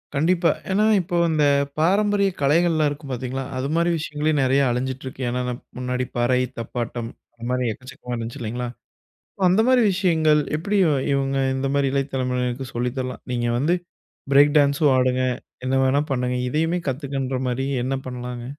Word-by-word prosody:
கண்டிப்பா. 170 +4 +3 0.2
ஏன்னா 205 +3 +3 0.2
இப்போ 175 0 -4
அந்த 155 -2 +2 0.4
பாரம்பரிய 200 +4 +3
கலைகள்லாம் 155 +1 +3
இருக்கும் 145 -1 -7
பாத்தீங்களா, 130 +2 -3
அதுமாரி 160 +6 0
விஷயங்களே, 150 0 -1
நிறைய 135 +2 +3
அழிஞ்சிட்டு 130 +2 -3
இருக்கு. 130 0 -7
ஏன்னானா 125 0 -2 0.2
முன்னாடி 125 0 -2
பறை, 120 +1 +2 0.2
தப்பாட்டம், 120 0 -4 0.3
அந்த 115 - -12
மாரி 125 -1 0
எக்கச்சக்கமா 130 0 -9
இருந்துச்சு 115 +4 -5
இல்லைங்களா, 120 +2 -3 0.7
அப்ப 190 - 0
அந்த 190 +5 +4
மாரி 255 -1 +5
விஷயங்கள் 160 -5 +3 0.2
எப்படி 200 +6 -2
இவன் 145 -5 +1
இவங்க 135 0 0 0.2
இந்த 135 +1 -1
மாரி 140 -1 +2
இளையதலமுறையினருக்கு 130 -2 -1
சொல்லி 120 +1 0
தரலாம்? 130 -1 -4
நீங்க 120 -1 0
வந்து 160 +7 +2 0.6
பிரேக் 145 +2 +6
டான்ஸும் 140 0 +4
ஆடுங்க. 130 0 +2 0.4
என்ன 130 +1 +1
வேணா 130 +2 +3
பண்ணுங்க. 125 -1 0
இதையுமே 160 +5 0
கத்துக்கன்ற 135 -1 -3
மாரி 125 +2 -1 0.2
என்ன 135 +1 -1
பண்ணலாங்க?. 125 -1 -6
135 Hz, 150 wpm, -23 LUFS, 125-155 Hz, 0.7 s, பிரேக்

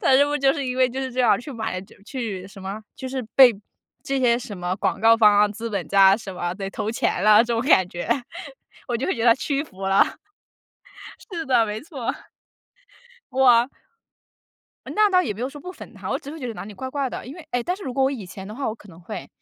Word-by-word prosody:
他 - - +3
是 270 +2 +6
不 290 - -2
是 295 - 0
就 270 0 +4
是 285 -2 -3
因 250 0 -3
为 255 -1 +4
就 260 +2 -4
是 260 -1 -4
这 255 - -1
样 245 - +4
去 280 +4 -8
买 220 -6 -3 0.2
去 215 -7 -5
什 195 - -13
么， 195 +3 -6
就 260 - -6
是 260 0 -3
被 260 -3 +9 0.5
这 275 0 -1
些 240 -2 +4
什 210 -5 -8
么 180 +1 -2
广 - - -1
告 225 +1 +6
方 215 -2 +6
啊、 210 - +6
资 225 +3 -6
本 195 -6 -3
家 195 0 +6
什 200 -4 -8
么 175 -1 -2
得 195 0 -5
投 210 - -3
钱 230 - -1
了， 210 0 +7
这 240 - -2
种 230 - 0
感 185 -8 +4
觉。 175 -1 -6 0.8
我 240 - 0
就 245 - -3
会 380 - 0
觉 230 - -3
得 - - +6
他 - - +7
屈 275 +2 -1
服 195 -10 -14
了， 195 0 +5 1.3
是 330 -2 -4
的， 250 -4 +3
没 210 0 -4
错， 275 -7 -4 1.2
哇 250 -2 +5 1.2
那 425 -1 +3
倒 365 -1 +4
也 210 - -3
没 210 - -9
有 255 - -1
说 290 +1 -11
不 360 - -7
粉 370 - -11
他， - - -6
我 - - 0
只 280 - -10
是 315 - -8
会 - - -10
觉 255 - -4
得 230 - -5
哪 - - -7
里 210 - -9
怪 260 +6 -6
怪 275 0 -2
的。 - - -7
因 265 - -8
为 340 -3 -12
哎， 245 0 0
但 360 +8 -2
是 400 - -11
如 260 - -4
果 270 - +1
我 265 - +2
以 250 -8 -5
前 190 +2 -9
的 210 - -7
话 275 +3 -2
我 220 - -3
可 210 - -18
能 170 -2 -14
会。 170 - -7
235 Hz, 280 characters per minute, -23 LUFS, 205-270 Hz, 1.3 s, 被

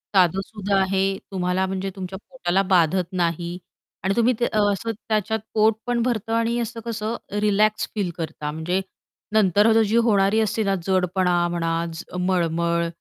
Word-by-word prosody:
साधंसुधं 195 +3 +1
आहे, 195 0 +1
तुम्हाला 185 0 0
म्हणजे 190 +1 -3
तुमच्या 190 0 -6
पोटाला 195 -8 0
बाधत 180 +1 +3
नाही. 175 -1 -1 0.5
आणि 195 +1 +1
तुम्ही 235 +2 +3
ते 240 - +2
असं 205 +1 +1
त्याच्यात 220 0 -1
पोट 220 +1 +4
पण 240 -1 +1
भरतं 225 -3 -1
आणि 230 +1 +1
असं 235 0 -4
कसं 225 0 -3 0.3
रिलॅक्स 210 +1 +2
फील 200 -4 -1
करता, 155 -3 -4
म्हणजे 165 +5 -1 0.5
नंतरची 215 +2 +4
जी 215 - 0
होणारी 200 0 +3
असते 220 0 0
ना 195 -1 +1
जडपणा 185 -1 +2
म्हणा, 165 -1 -1
च 160 - -7 0.2
मळमळ 170 -2 +1
195 Hz, 150 wpm, -23 LUFS, 180-215 Hz, 0.5 s, पोट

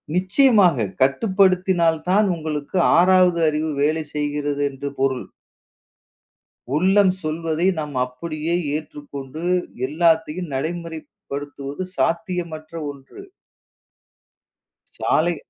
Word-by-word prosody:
நிச்சயமாக 185 - +4 0.2
கட்டுப்படுத்தினால் 185 +2 +3
தான் 205 +3 +4
உங்களுக்கு 155 +1 -4 0.2
6வது 180 -1 +5
அறிவு 155 +1 0
வேலை 155 +2 +1
செய்கிறது 145 -1 -2
என்று 140 +1 -6
பொருள். 135 -1 0 1.5
உள்ளம் 190 +4 +4
சொல்வதை 160 +2 -1
நாம் 150 -2 -5
அப்படியே 155 +5 -4 0.2
ஏற்றுக்கொண்டு 145 -1 -7 0.4
எல்லாத்தையும் 160 +1 +1
நடைமுறைப்படுத்துவது 145 -1 -6
சாத்தியமற்ற 165 -2 -2 0.2
ஒன்று. 140 - -13 1.7
சாலை 170 +2 +1
160 Hz, 75 wpm, -22 LUFS, 145-180 Hz, 1.7 s, 6வது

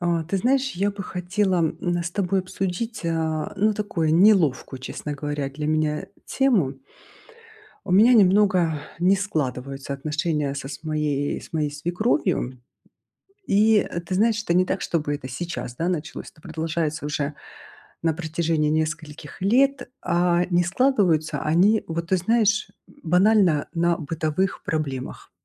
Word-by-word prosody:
А 170 -2 0
ты 175 +5 -2
знаешь, 265 +5 +1
я 200 +3 0
бы 200 0 -6
хотела, 185 +1 -1
м, 175 +1 -1
с 170 - -4
тобой 195 0 0
обсудить, 195 +4 -4
а, 160 -2 -1
ну, 215 +2 +2
такую 170 -7 0
неловкую, 165 -9 +3
честно 145 +2 -6
говоря, 145 -1 -3
для 150 +2 -5
меня 155 +2 0 0.2
тему. 220 - +1 1.1
У 185 - -3
меня 220 +6 +6
немного 190 -6 +4 0.2
не 185 +3 +4
складываются 140 -8 -3
отношения 150 0 -2
со 140 -1 -6
моей 150 -2 -1
с - - -14
моей 155 -2 0
свекровью. 170 - -1 0.9
И, 215 +2 +4
э, 170 - -2
ты 175 +2 -5
знаешь, 225 +2 +2
это 170 - -1
не 180 +1 +4
так, 190 - -2
чтобы 150 -3 -1
это 130 -2 -6
сейчас, 130 -3 -5
да, 165 +5 -1
началось. 175 0 -4
Это 155 - -23
продолжается 160 -2 -3
уже 145 0 -2 0.7
на 165 -1 +2
протяжении 160 -1 -1
нескольких 155 0 -3
лет. 260 +7 +2
А, 175 0 +2
не 175 0 +3
складываются 185 - +1
они, 185 +8 +3
вот, 165 0 -4
ты 190 - +3
знаешь, 215 +2 +2 0.2
м, - - -21
банально 180 -2 +3
на 170 0 +1
бытовых 160 +4 -2
проблемах. 140 -5 -4
170 Hz, 145 wpm, -24 LUFS, 155-195 Hz, 1.1 s, меня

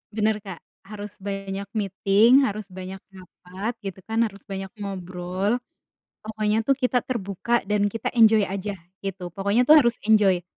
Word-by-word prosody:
Benar 215 -1 +1
Kak. 190 -5 -8 0.3
Harus 210 0 -8
banyak 195 0 -5
meeting, 215 +6 +4
harus 215 0 -4
banyak 185 +1 -7
rapat, 190 +3 -7
gitu 195 -1 -6
kan, 225 +1 +2
harus 200 -3 -4
banyak 195 -1 -5
ngobrol. 190 +2 -2 0.7
Pokoknya 215 0 0
tuh 275 - +4
kita 250 -2 0
terbuka 235 0 -1
dan 210 -1 +2
kita 215 +2 -2
enjoy 220 -1 +7
aja, 200 +1 -3 0.3
gitu. 185 -2 -4
Pokoknya 200 +6 +1
tuh 310 - +9
harus 240 -5 +4 0.2
enjoy. 200 -5 +5
205 Hz, 150 wpm, -24 LUFS, 195-220 Hz, 0.7 s, tuh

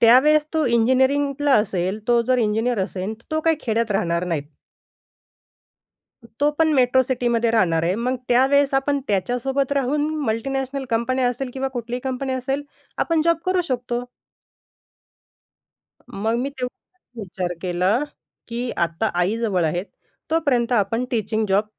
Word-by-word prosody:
त्यावेळेस 295 +6 +6
तो 315 - +2
इंजिनिअरिंगला 265 +4 +2
असेल, 195 -1 0
तो 240 -1 +5
जर 255 -1 +3
इंजिनिअर 225 +1 +1
असेन, 195 +2 -4
तर 230 - -24
तो 315 0 0
काही 325 -1 +2
खेड्यात 230 -1 0
राहणार 170 -2 0
नाहीत. 165 -5 -2 2.0
तो 290 - +4
पण 315 -1 +3
मेट्रो 260 0 +4
सिटीमध्ये 240 -2 0
राहणार 170 -8 +2
आहे, 175 +3 +1
मग 250 +3 -1
त्यावेळेस 275 +3 +4
आपण 280 +1 +1
त्याच्यासोबत 250 +8 0
राहून 285 +2 +1 0.2
मल्टिनॅशनल 265 +4 -2
कंपन्या 250 +3 +1
असेल 250 +1 -3
किंवा 270 0 -2
कुठलीही 240 +2 -4
कंपनी 265 0 -2
असेल, 270 +2 -2 0.4
आपण 330 -2 +2
जॉब 335 -1 +4
करू 370 -1 +2
शकतो. 245 -1 -2 2.2
मग 225 +1 +2
मी 265 +3 -1
तेवढाच 265 +7 -8 0.2
विचार 180 -2 -4
केला 185 +5 +1 0.5
की 240 +1 -3
आता 170 +6 -2
आईजवळ 200 -2 0
आहेत 175 +4 -1 0.5
तोपर्यंत 260 -7 +1
आपण 225 +3 +1
टीचिंग 220 -1 0
जॉब 200 +2 +3
245 Hz, 135 wpm, -22 LUFS, 215-270 Hz, 2.2 s, त्यावेळेस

